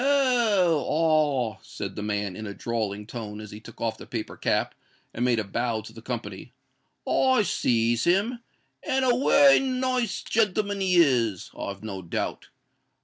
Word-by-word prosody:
"Oh! 235 - +3
ah!" 150 -7 +1
said - - -7
the - - -5
man, 105 -2 -2
in 110 +1 -6
a 100 - -7
drawling 105 -3 -3
tone, 105 -2 -7
as 110 -1 -9
he 105 - -9
took 115 +1 -14
off 110 -1 -2
the - - -10
paper - - -5
cap, - - 0 0.4
and 120 - -2
made 125 -2 +2
a 110 - 0
bow 115 +2 -2
to 110 +1 -12
the 115 - -11
company; 115 -2 -6 0.5
"I 260 -4 +3
sees 115 - +1
him, 205 +8 +2 0.4
and 265 -3 0
a 250 - +4
wery 275 +2 +6
nice 255 -4 -1
gentleman 205 -2 0
he 185 -1 +2
is, 120 - +2
I've 100 +1 -6
no 100 -3 -5
doubt. 85 - -4
125 Hz, 165 wpm, -26 LUFS, -, 0.5 s, wery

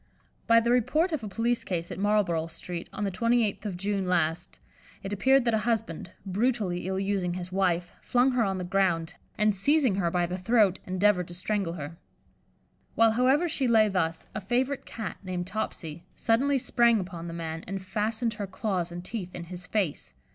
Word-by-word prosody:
By 230 0 +7
the 235 +1 +1
report 305 +9 +2
of 305 -7 -2
a - - -4
police 230 +4 0
case 170 -2 -3
at - - -5
Marlborough 195 -6 +2
Street, 170 +1 -7
on - - -4
the 200 - 0
28th 230 +1 +1
of 185 -3 -4
June 195 0 -1
last, 175 0 0 0.5
it 195 +1 -4
appeared 265 +5 +4
that 235 - +2
a 220 - +3
husband, 220 -8 -2
brutally 200 -3 0
ill 190 0 -1
using 195 -3 -1
his 180 0 -6
wife, 180 -2 +1
flung 250 +2 +3
her 250 -2 +2
on 195 -2 0
the 180 - -3
ground, 180 -3 +1 0.2
and 210 -1 +3
seizing 265 +4 +3
her 175 -4 +1
by 175 0 +1
the 180 +2 -4
throat, 205 -1 +3
endeavoured 185 -1 +2
to 175 - -9
strangle 190 -1 -1
her. 160 0 -7 1.0
While, 225 0 +5
however, 260 +8 +3
she 275 -5 0
lay 220 -2 +5
thus, 165 -4 -1
a 215 - -4
favourite 250 +7 -1
Cat, 225 - -5
named 180 -2 -3
"Topsy," 175 -5 -5
suddenly 270 +5 +2
sprang 235 -2 +3
upon 175 -3 -6
the 165 - -6
man, 165 -1 -5
and 195 +1 -3
fastened 220 +4 -1
her 205 -2 -5
claws 185 -3 -2
and 175 +1 -7
teeth 185 -5 -5
in 175 - -5
his 180 0 -5
face. 195 -9 -2
195 Hz, 190 wpm, -28 LUFS, 180-230 Hz, 1.0 s, By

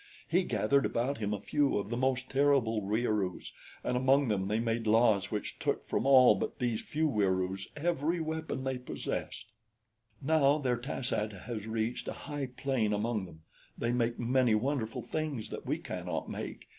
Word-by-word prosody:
He 180 +3 +3
gathered 120 - +2
about 125 +3 -1
him 105 -2 -1
a 105 - -1
few 145 +4 +1
of 100 0 -3
the 120 - -2
most 130 0 0
terrible 135 -6 +3
Wieroos, 105 -2 -1 0.3
and - - 0
among 130 +1 +3
them 95 -2 0
they 105 +2 0
made 115 -1 -1
laws 110 -3 +4
which 105 - -4
took - - -1
from - - 0
all 130 -4 +8
but 100 - -3
these 120 -4 -1
few 155 +1 0
Wieroos 95 -5 0
every 165 +1 0
weapon 160 -4 -3
they 130 -1 -2
possessed. 120 -3 -5 0.7
"Now 145 0 +3
their 125 -5 0
tas 125 0 -3
ad 105 0 -1
has 110 -3 -5
reached 110 +1 -2
a - - -2
high 145 -2 -5
plane 125 -4 -1
among 105 -1 -1
them. 80 -2 -14 0.4
They 115 - 0
make 120 -1 0
many 125 -1 +3
wonderful 115 -1 -1
things 150 -8 -3
that - - -7
we - - +1
cannot - - -4
make. - - -6
120 Hz, 175 wpm, -31 LUFS, 110-140 Hz, 0.7 s, all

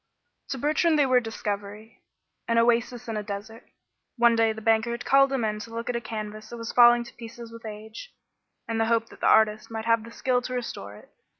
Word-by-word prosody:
To 270 - -3
Bertrand 305 +4 +2
they 290 - +4
were 255 -1 +4
a - - +4
discovery 210 -1 -6 0.5
an 230 - +1
oasis 235 +1 +1
in 225 -1 -3
a - - -2
desert. 210 +2 -8 0.5
One 235 -1 +5
day 225 -1 +3
the 220 - -6
banker 225 +1 +2
had 235 +1 -4
called 275 0 +5
him 260 -4 0
in 210 0 -2
to 220 - -8
look 230 +1 -4
at - - -6
a 235 - -2
canvas 215 -1 -6
that 240 - -8
was 230 0 -5
falling 240 0 +7
to 235 - -13
pieces 230 0 -10
with 230 -1 -10
age, 220 - -9 0.6
in 225 -1 -2
the 225 - +3
hope 230 0 +1
that - - -15
the - - +2
artist 215 -1 +3
might 225 -1 -5
have 230 -1 +2
the 230 - -10
skill 250 +1 0
to 255 +1 -5
restore 105 - -5
it. - - -16
230 Hz, 230 wpm, -26 LUFS, 220-240 Hz, 0.6 s, falling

